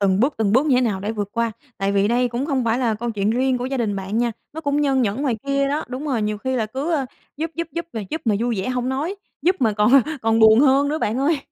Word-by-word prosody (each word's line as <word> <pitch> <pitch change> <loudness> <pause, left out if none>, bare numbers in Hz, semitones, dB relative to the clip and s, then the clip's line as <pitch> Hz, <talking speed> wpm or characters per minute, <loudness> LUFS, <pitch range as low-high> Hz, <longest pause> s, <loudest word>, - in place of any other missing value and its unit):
từng 195 -1 +2
bước, 270 +5 +2
từng 215 -3 +1
bước 260 +6 +4
như 275 - +3
thế - - +4
nào 215 -6 0
để 205 +3 -3
vượt 205 -2 -3
qua? 230 -1 0 0.3
Tại 195 0 0
vì 200 +1 +2
đây 245 +2 +2
cũng 245 +4 -3
không 265 -5 0
phải 230 +2 +1
là 235 -4 +1
câu 235 +2 -3
chuyện 205 -1 0
riêng 255 +2 +1
của 245 - -3
gia 270 +1 -2
đình 215 -5 -1
bạn 195 +3 -3
nha, 240 -1 +1 0.2
nó 320 - -6
cũng 285 -1 0
nhơn 270 -3 +2
nhởn 220 +4 -1
ngoài 255 -6 0
kia 275 0 +1
đó. 295 +2 -1
Đúng 255 +3 -5
rồi, 250 -6 0
nhiều 210 0 -2
khi 260 +3 -2
là 220 - 0
cứ, 270 +9 -4
ơ, 275 -5 0 0.3
giúp 320 +2 -3
giúp 335 0 -3
giúp 335 0 -4
mà 225 - -3
giúp 320 - -3
mà 220 - +2
vui 235 -4 0
vẻ 190 - -3
hông 250 0 -1
nói, 285 +8 -2 0.3
giúp 365 +2 +3
mà 225 -3 +3
còn 210 +2 +2 0.3
còn 225 0 +2
buồn 220 +2 +7
hơn 280 0 +4
nữa 305 +2 -1
bạn 225 -4 -1
ơi. 290 +3 +2
245 Hz, 300 wpm, -21 LUFS, 220-275 Hz, 0.3 s, buồn